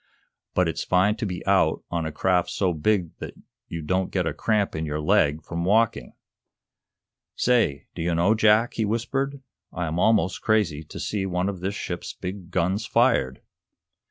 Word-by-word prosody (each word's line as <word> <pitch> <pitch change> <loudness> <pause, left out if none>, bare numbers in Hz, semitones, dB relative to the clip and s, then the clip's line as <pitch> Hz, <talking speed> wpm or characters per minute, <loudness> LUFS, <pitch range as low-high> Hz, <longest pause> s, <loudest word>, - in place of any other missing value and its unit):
but 90 -1 +3
it's 80 - -2
fine 95 +3 +2
to 110 -1 -3
be 90 -2 -5
out 95 -5 +2
on 85 -2 -1
a - - -4
craft 90 +3 +1
so 95 -3 0
big 85 +1 0
that - - -7 0.3
you 85 -1 -6
don't 95 +3 0
get 90 -3 -1
a 80 - -1
cramp 105 -1 0
in 80 - -2
your 75 -1 -3
leg 80 -3 +2
from 85 +2 -4
walking! 110 +5 +1 1.2
Say, 115 - +1
do - - -6
you 85 0 0
know, 90 +6 +3
Jack," 110 +1 +3
he 110 - -1
whispered, 135 +6 -2 0.3
"I 90 - -3
am 80 +2 -2
almost 100 -4 +2
crazy 100 -9 +1
to - - -9
see 100 -2 -2
one 90 +1 -1
of 95 -3 -5
this 95 +3 -3
ship's - - -5
big 90 -1 -7
guns 95 +4 0
fired!" 90 - +2
95 Hz, 180 wpm, -25 LUFS, 85-105 Hz, 1.2 s, but